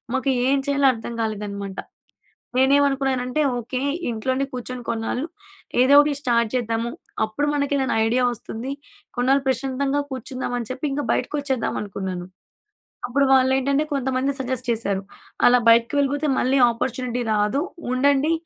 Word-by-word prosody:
మాకు 265 +1 0 0.2
ఏం 275 +1 +3
చేయాలో 280 -1 +3
అర్థం 230 0 -7
కాలేదన్నమాట. 200 -3 -4 0.8
నేనేమనుకున్నానంటే, 270 0 +2 0.2
ఓకె. 250 +2 -4 0.3
ఇంట్లోనే 260 +5 -1
కూర్చొని 250 0 -6
కొన్నాళ్ళు 235 +6 -2 0.5
ఏదో 265 +2 +5
ఒకటి 295 0 +2
స్టార్ట్ 235 -3 +2
చేద్దాము. 230 0 -1 0.3
అప్పుడు 250 +7 -2
మనకు 285 0 0
ఏదైనా 265 -4 0
ఐడియా 250 +3 +2
వస్తుంది. 240 +3 -6 0.5
కొన్నాళ్ళు 265 +2 +2
ప్రశాంతంగా 270 +2 0
కూర్చుందాం, 255 0 -4
అని 230 - -6
చెప్పి 260 +3 -4
ఇంకా 290 +1 -2
బయటకి - - -1
వచ్చేద్దాం 265 -4 -1
అనుకున్నాను. 190 -3 -5 0.8
అప్పుడు 275 +3 +2
వాళ్ళు 260 0 +5
ఏంటంటే 280 +3 +1
కొంతమంది 265 0 0
సజెస్ట్ 260 -1 -3
చేశారు. 200 -4 -1 0.4
అలా 250 0 +6
బయటికి 230 +3 +5
వెళ్ళిపోతే 285 +2 +1
మళ్ళీ 260 +2 +2
అపార్చునిటీ 245 +1 -2
రాదు. 210 +6 +1 0.3
ఉండండి 280 +4 +3
255 Hz, 135 wpm, -23 LUFS, 230-275 Hz, 0.8 s, అలా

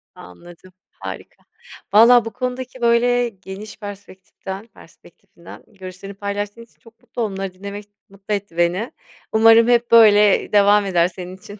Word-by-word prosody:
Anladım. 175 - -15 0.2
Harika. - - -10 0.5
Vallahi 235 +2 +6
bu 225 - -6
konudaki 255 0 -6
böyle 240 +1 +2
geniş 195 +1 -11
perspektiften 195 0 -10
perspektifinden - - -17
görüşlerini 195 -1 -11
paylaştığın 205 +2 -5
için 230 - -19
çok 230 -2 -21
mutlu 245 -1 -7
onları 195 -3 -4
dinlemek 200 +2 -9 0.2
mutlu 195 +2 -7
etti 200 -4 -5
beni. 175 +7 0 0.4
Umarım 225 +1 +5
hep 240 -1 +1
böyle 210 -3 +5
devam 205 0 +4
eder 175 -3 +2
senin 180 +1 -10
için. 200 +2 -13
205 Hz, 135 wpm, -19 LUFS, 190-230 Hz, 0.5 s, Vallahi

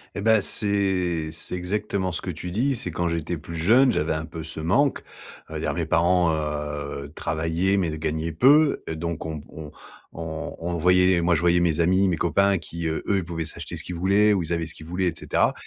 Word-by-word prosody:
Et 100 - -3
ben 110 -1 +4
c'est 95 -7 0
c'est 80 - -4
exactement 95 0 -2
ce 85 - -4
que 90 - -3
tu 85 +2 -6
dis, 125 +8 0
c'est 90 - -2
quand 85 +1 -1
j'étais 85 0 -2
plus 85 +2 -9
jeune, 120 +11 +4
j'avais 75 +1 0
un 80 +1 -3
peu 80 -1 -8
ce 80 -1 -5
manque, 125 - +2 0.5
heu, - - -4
il - - -5
y - - -1
a - - 0
mes - - -2
parents, 85 -1 +3
heu, 75 -2 -4
travaillaient, 80 +5 0
mais 85 -5 0
ne - - -4
gagnaient 80 +1 -2
peu, 140 - +4
heu, 80 - -3
donc 85 0 -4
on 80 - -4
b 75 - -8
on 75 -2 -9 0.4
on 80 -1 -6
on 85 +1 -3
voyait 90 +2 +4
les 90 -2 +3
moi, 85 0 +3
je 80 - 0
voyais 85 0 +4
mes 85 -2 +1
amis, 95 +3 +3
mes 90 -2 0
copains 100 +4 +2
qui, 85 0 -5
heu, 80 - -2
eux, 100 - +2
ils 95 - -1
pouvaient 80 -1 -4
s'acheter - - -5
ce - - -3
qu'ils 90 - -6
voulaient 100 +4 +3
ou 95 - +1
ils 80 +1 -5
avaient 85 -1 -1
ce 85 - -7
qu'ils 80 - -12
voulaient 90 +2 -1
et - - -5
cetera - - +1
85 Hz, 245 wpm, -24 LUFS, 80-95 Hz, 0.5 s, ben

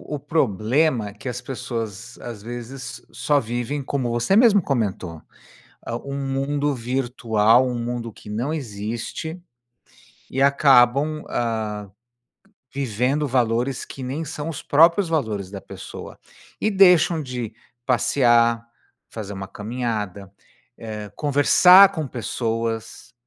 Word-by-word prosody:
o 145 - -5
problema 130 - +1
é - - -12
que 110 +5 -7
as 125 0 -4
pessoas, 120 -3 -6
às 115 -4 -8
vezes, 120 +3 -8
só 145 -1 +1
vivem 120 +4 -3
como 130 -3 -2
você 120 +11 +1
mesmo 220 -3 +6
comentou, 95 - -2 0.7
hã, 115 - -3
um 140 0 -5
mundo 140 +2 -1
virtual, 120 -1 +2
um 125 -1 -3
mundo 120 -1 -4
que - - -14
não 120 +8 -2
existe, 120 - -5 0.9
e 135 - 0
acabam, 140 +2 +4
hã, 110 -3 -2 0.8
vivendo 135 +3 0
valores 125 +1 0
que 135 - -9
nem 135 +6 -3
são 150 +1 -5
os 160 - -5
próprios 165 +4 +4
valores 110 - -1
da 100 -1 -7
pessoa. - - -10 0.4
E 215 - +1
deixam 180 -4 +5
de: 125 -4 -5 0.3
passear, 120 -2 +3 0.5
fazer 100 -3 -6
uma 95 0 -6
caminhada, 105 -4 -4 0.5
eh, 105 -3 -7
conversar 180 - +6
com 160 -5 -3
pessoas, 115 -1 -4
125 Hz, 120 wpm, -22 LUFS, 115-140 Hz, 0.9 s, mesmo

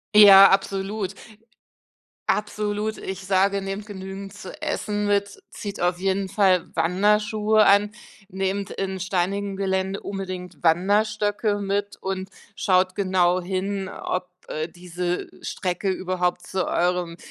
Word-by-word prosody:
Ja, 195 -2 +10
absolut. 195 0 -1 1.2
Absolut. 210 +1 -1
Ich 190 0 -6
sage: 195 +1 +2
„Nehmt 195 +2 -5
genügend 195 -1 -8
zu 190 -2 -9
essen 210 -1 -2
mit, 200 0 0
zieht 205 -4 -7
auf 175 0 +1
jeden 195 0 0
Fall 185 -4 +2
Wanderschuhe 210 +4 +3
an, 205 +1 +5 0.4
nehmt 195 +1 -2
in 190 -1 -3
steinigem 195 +2 -1
Gelände 190 0 -1
unbedingt 185 -3 -6
Wanderstöcke 205 +4 +2
mit 200 0 -2
und 190 0 -4 0.3
schaut 185 -1 +2
genau 185 -2 +2
hin, 190 +1 -3
ob, 180 -1 -4 0.2
äh, 155 +1 -3
diese 175 0 -4
Strecke 185 +2 -2
überhaupt 180 -1 -1
zu 185 -1 -1
eurem, 175 -1 0
195 Hz, 120 wpm, -24 LUFS, 185-205 Hz, 1.2 s, Ja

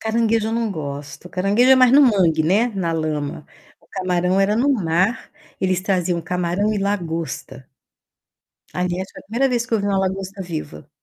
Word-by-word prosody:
Caranguejo 225 0 +1
eu 225 - -3
não 230 -2 -1
gosto. 145 +1 -7
Caranguejo 200 +8 +2
é - - +9
mais 255 -1 +5
no 285 - +7
mangue, 180 - +3
né, 195 +9 +3
na 190 -7 -2
lama. 155 -2 -3 0.3
O - - -27
camarão 185 0 0
era 205 +2 +2
no 260 +4 +2
mar. 190 +3 0 0.3
Eles 185 -1 +1
traziam 180 -3 0
camarão 180 +5 -1
e - - -1
lagosta. 170 -8 -4 1.1
Aliás, 180 +1 -2
foi - - -11
a - - -19
primeira 240 +6 +1
vez 240 0 0
que 230 - -1
eu 215 - +1
vi 200 - -2
uma 195 -1 +1
lagosta 190 +1 -3
viva. 155 - -7
190 Hz, 180 wpm, -21 LUFS, 170-215 Hz, 1.1 s, é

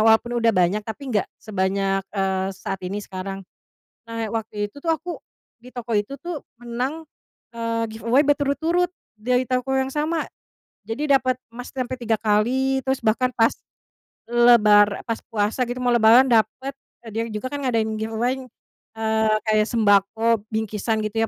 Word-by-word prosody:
walaupun 225 +2 +4
udah 230 -1 +4
banyak, 185 +5 +2
tapi 245 +5 -7
nggak 205 - +2 0.2
sebanyak, 195 -1 0 0.2
eee, 190 0 0
saat 195 - -4
ini, 195 +3 -3
sekarang. 195 +1 -6 0.7
Nah, 230 0 -3
waktu 215 -2 -2
itu 285 - -18
tuh 330 - -2
aku 340 +2 -5 0.4
di 250 - -12
toko 240 -2 -4
itu 210 +7 -3
tuh 345 -4 -5 0.2
menang, 250 +7 -3 0.5
eee, 230 0 -1
giveaway 235 +5 +3
berturut-turut, 300 +5 +1 0.3
dari 250 +3 +1
toko 255 +1 0
yang 265 0 0
sama. 310 +2 0 0.6
Jadi, 255 +7 -2
dapet 255 -2 +3 0.2
emas 245 +1 -8
sampai 255 -1 -3
3 225 -2 +1
kali, 255 +6 +2
terus 265 0 0
bahkan 235 +4 +2
pas 225 0 +4 0.8
lebar 215 -4 +5
pas 230 - -2
puasa 220 +2 0
gitu, 245 +1 -4
mau 245 - +3
lebaran 235 +2 +7
dapet 235 +4 +1 0.3
eee, 225 - -9
dia 225 - 0
juga 215 +4 -4
kan 285 - -3
ngadain 225 -3 +1
giveaway, 225 +4 -1 0.6
eee, 220 -1 +1
kayak 215 0 +3
sembako, 220 0 +3
bingkisan 220 0 -1
gitu 215 +1 -2
230 Hz, 150 wpm, -23 LUFS, 215-255 Hz, 0.8 s, lebaran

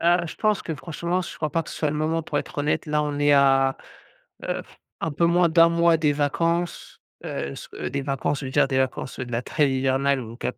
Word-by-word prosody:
Ah, 175 +1 +3
je 160 - -7
pense 215 -1 +1
que 160 - -4
franchement, 170 +3 -3
je - - -7
crois 155 -1 -2
pas 165 +2 0
que - - -11
ce - - -7
soit 150 -2 0
le 150 - -3
moment 160 +2 0
pour 145 - -2
être - - -6
honnête. 150 +2 0
Là 150 0 +1
on 145 -1 -3
est 145 0 +4
à 135 -1 +4 0.7
heu, - - -2
f - - -21 0.2
un 160 - -1
peu 170 +4 +2
moins 175 0 +4
d'un 165 +1 +6
mois 170 0 +4
des 150 -2 +2
vacances. 165 +4 -1 0.2
Heu, 70 - -4
s - - -9 0.2
des 140 - -2
vacances, 135 +1 -1
je 135 - -5
veux - - -5
dire 130 - +3
des 130 -1 0
vacances, 130 0 -2
heu, 130 - -4
de 120 - -9
la 115 +2 -1
trêve 145 +1 +1
hivernale, 135 +1 +1
donc 115 0 -9
150 Hz, 250 wpm, -24 LUFS, 135-165 Hz, 0.7 s, d'un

